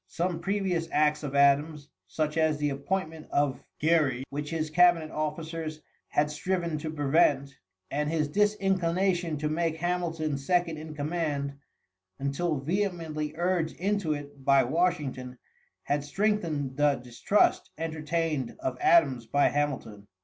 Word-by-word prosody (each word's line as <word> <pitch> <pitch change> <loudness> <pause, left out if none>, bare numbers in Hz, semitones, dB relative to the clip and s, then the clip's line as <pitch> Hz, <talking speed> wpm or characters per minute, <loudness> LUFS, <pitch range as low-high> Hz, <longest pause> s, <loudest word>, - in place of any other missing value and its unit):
Some 170 - -2
previous 185 -2 -1
acts 150 0 +2
of 140 -2 -5
Adams, 145 +1 +3 0.2
such 155 -1 -2
as 160 -2 +2
the 145 -1 0
appointment 160 +2 -3
of 145 -2 0 0.2
Gerry, 150 -5 +2
which 145 +1 -4
his 155 -2 -2
cabinet 170 -2 +4
officers 155 +1 -4 0.3
had 150 0 +1
striven 170 0 -2
to 155 +1 -4
prevent, 145 -2 +2 0.4
and 150 +1 0
his 155 -2 0
disinclination 185 -3 +1
to 150 +1 -1
make 160 +1 -1
Hamilton 165 -4 -1
second 170 +2 +1
in 155 0 -8
command, 145 -2 -2 0.6
until 145 +4 -1
vehemently 160 -1 -2
urged 175 -2 0
into 195 -4 0
it 145 -1 -8
by 140 -1 +5
Washington, 135 -4 -1 0.5
had 145 0 0
strengthened 155 -6 -1
the 145 -1 +4
distrust 125 - +1
entertained 160 -4 -2
of 125 -1 -3
Adams 135 -9 +4
by 145 +5 +3
Hamilton. 130 -8 -2
155 Hz, 130 wpm, -28 LUFS, 145-170 Hz, 0.6 s, by